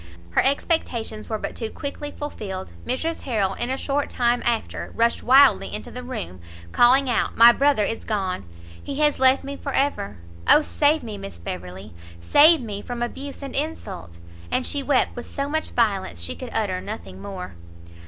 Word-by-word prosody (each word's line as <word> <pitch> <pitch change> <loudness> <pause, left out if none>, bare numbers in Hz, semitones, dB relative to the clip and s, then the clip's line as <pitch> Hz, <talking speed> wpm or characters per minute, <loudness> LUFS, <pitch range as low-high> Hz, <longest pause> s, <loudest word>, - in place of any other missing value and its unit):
Her - - +3
expectations 250 -6 -1
were 220 - -1
but - - -5
too 225 -2 -4
quickly 290 +2 -5
fulfilled; 205 -11 -6 0.2
Mrs 320 +7 -2
Harrel 210 -7 0
in 240 +4 -3
a 265 - -1
short 285 +1 -1
time 240 0 +1
after 235 -2 -2
rushed 235 +1 +2
wildly 270 +3 +5
into - - -5
the 250 - -6
room, 220 - -6 0.3
calling 260 +3 +5
out 245 - 0
"My 235 +1 +10
brother 275 -3 +2
is 225 - -3
gone! 190 - -2 0.4
he 280 - -6
has 295 0 +2
left 260 +1 +5
me 280 +1 -5
for 280 0 -5
ever! 265 - 0 0.3
Oh 300 - +8
save 300 +1 +2
me, 215 -3 -6
Miss 95 -4 -8
Beverley, 90 +3 -7 0.3
save 300 - +6
me 205 -4 -5
from 240 +1 -4
abuse 275 +4 -6
and 275 - -6
insult!" 200 - -3 0.3
And 255 - 0
she 285 - 0
wept 275 -1 +1
with 240 - -7
so 280 0 -3
much 315 +2 -2
violence 200 - 0
she 85 0 -3
could 85 - -7
utter 90 - -1
nothing 95 0 -7
more. 185 - -7
240 Hz, 180 wpm, -23 LUFS, 195-280 Hz, 0.4 s, My